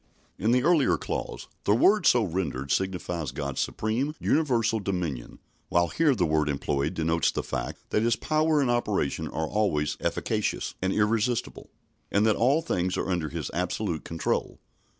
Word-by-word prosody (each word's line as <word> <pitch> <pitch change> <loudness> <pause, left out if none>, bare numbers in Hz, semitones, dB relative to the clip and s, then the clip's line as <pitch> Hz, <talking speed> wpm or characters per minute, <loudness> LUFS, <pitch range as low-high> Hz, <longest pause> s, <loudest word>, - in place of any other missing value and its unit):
In 110 - +1
the 125 +1 +3
earlier 160 -3 +4
clause, - - -5 0.2
the 100 - +4
word 195 - +4
so 120 -2 +5
rendered 80 -8 -3
signifies 90 -6 -1
God's 70 -1 -4
supreme, 125 +8 -1
universal 120 -7 +1
dominion, 90 - -3 0.3
while 85 0 +2
here 155 -4 +2
the 90 - +1
word 75 -2 +1
employed 70 +3 -1
denotes 80 -1 +1
the - - -3
fact - - -5
that 105 - +2
His 115 0 +2
power 155 +1 +1
and 125 -3 +2
operation 105 - 0
are 80 0 -3
always 80 -8 0
efficacious - - -1
and 95 0 +1
irresistible, 110 +3 0 0.4
and 105 +2 +3
that 110 -2 +4
all 140 +7 +2
things 90 - -1
are - - -1
under 85 -4 -1
His - - -5
absolute 90 -1 -2
control. 80 -1 -2
100 Hz, 160 wpm, -27 LUFS, 80-120 Hz, 0.4 s, so